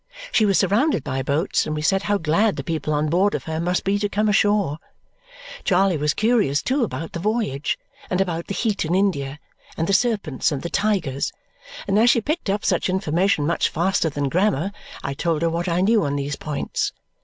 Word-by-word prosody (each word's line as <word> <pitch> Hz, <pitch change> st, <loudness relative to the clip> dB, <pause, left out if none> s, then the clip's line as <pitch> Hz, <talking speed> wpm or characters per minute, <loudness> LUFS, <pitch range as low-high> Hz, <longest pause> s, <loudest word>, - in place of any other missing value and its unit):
She 215 Hz, -, +3 dB
was 195 Hz, -, +3 dB
surrounded 205 Hz, -, +2 dB
by 135 Hz, -1 st, -2 dB
boats, 145 Hz, +8 st, 0 dB
and 155 Hz, -, -2 dB
we 150 Hz, -, -3 dB
said 195 Hz, +4 st, +2 dB
how 205 Hz, 0 st, +1 dB
glad 195 Hz, +6 st, +2 dB
the -, -, -5 dB
people 160 Hz, -2 st, -2 dB
on 150 Hz, 0 st, +1 dB
board 185 Hz, +6 st, +2 dB
of -, -, -4 dB
her 160 Hz, 0 st, -3 dB
must 180 Hz, +2 st, 0 dB
be 200 Hz, +1 st, +1 dB
to 205 Hz, 0 st, -1 dB
come 210 Hz, +2 st, 0 dB
ashore. 205 Hz, -7 st, +2 dB, 0.8 s
Charley 190 Hz, -1 st, +3 dB
was 150 Hz, -1 st, 0 dB
curious, 215 Hz, -, +2 dB
too, 265 Hz, +1 st, +1 dB
about 165 Hz, -, -4 dB
the 170 Hz, -, -5 dB
voyage, 205 Hz, -, -1 dB, 0.3 s
and 180 Hz, -, 0 dB
about 170 Hz, -3 st, -1 dB
the 200 Hz, -, -4 dB
heat 215 Hz, -4 st, 0 dB
in 165 Hz, +3 st, 0 dB
India, 145 Hz, -8 st, 0 dB, 0.4 s
and 165 Hz, -, 0 dB
the 195 Hz, -, 0 dB
serpents 195 Hz, -, +1 dB
and 140 Hz, -2 st, -3 dB
the 170 Hz, -, -4 dB
tigers; 190 Hz, -10 st, 0 dB, 0.6 s
and 200 Hz, +1 st, +3 dB
as 235 Hz, +2 st, +5 dB
she 240 Hz, -, +4 dB
picked 305 Hz, -, -2 dB
up 205 Hz, +2 st, -1 dB
such -, -, +1 dB
information 180 Hz, -2 st, +1 dB
much 170 Hz, -, +1 dB
faster 170 Hz, 0 st, +1 dB
than 145 Hz, -1 st, -2 dB
grammar, 185 Hz, +2 st, +1 dB, 0.3 s
I 140 Hz, -, -2 dB
told 165 Hz, +2 st, -1 dB
her 165 Hz, -, +2 dB
what 170 Hz, +2 st, -2 dB
I 170 Hz, +1 st, +1 dB
knew 215 Hz, +1 st, +3 dB
on 140 Hz, -1 st, -1 dB
those 145 Hz, 0 st, -2 dB
points. 150 Hz, -2 st, -3 dB
180 Hz, 210 wpm, -22 LUFS, 155-205 Hz, 0.8 s, as